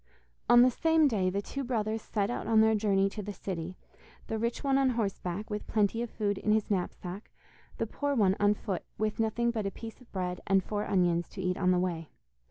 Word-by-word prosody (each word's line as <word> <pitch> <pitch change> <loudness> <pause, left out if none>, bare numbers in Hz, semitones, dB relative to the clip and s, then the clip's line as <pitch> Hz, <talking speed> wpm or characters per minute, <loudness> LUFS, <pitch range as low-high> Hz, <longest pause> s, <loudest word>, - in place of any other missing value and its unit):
On 240 0 +8
the 255 - +5
same 320 +3 +3
day 200 -8 +1
the 200 +2 -2
two 275 +5 -4
brothers 220 -3 -1
set 205 0 -1
out 245 - -4
on 220 -1 +5
their 220 0 +4
journey 200 -2 +2
to 210 - -5
the 205 0 -6
city, 185 -2 -5 0.5
the 220 - -3
rich 235 +1 -2
one 275 -1 +3
on 270 -1 +3
horseback, 205 -4 -3
with 210 0 -4
plenty 215 +1 +1
of 240 - -3
food 205 -3 -1
in 210 - 0
his 215 -1 0
knapsack, 185 +1 -3 0.5
the 225 - 0
poor 285 +5 -2
one 195 -5 +3
on 205 0 +4
foot 195 -4 -4
with 215 0 -1
nothing 235 +2 +1
but 220 -4 -2
a - - 0
piece 225 +4 -10
of 250 - -19
bread 180 -2 -3
and 195 -1 +3
four 210 +1 -3
onions 175 -3 +1
to 190 - -7
eat 180 0 0
on 180 -1 +1
the 180 - +4
way. 170 -3 -2
210 Hz, 225 wpm, -30 LUFS, 190-230 Hz, 0.5 s, On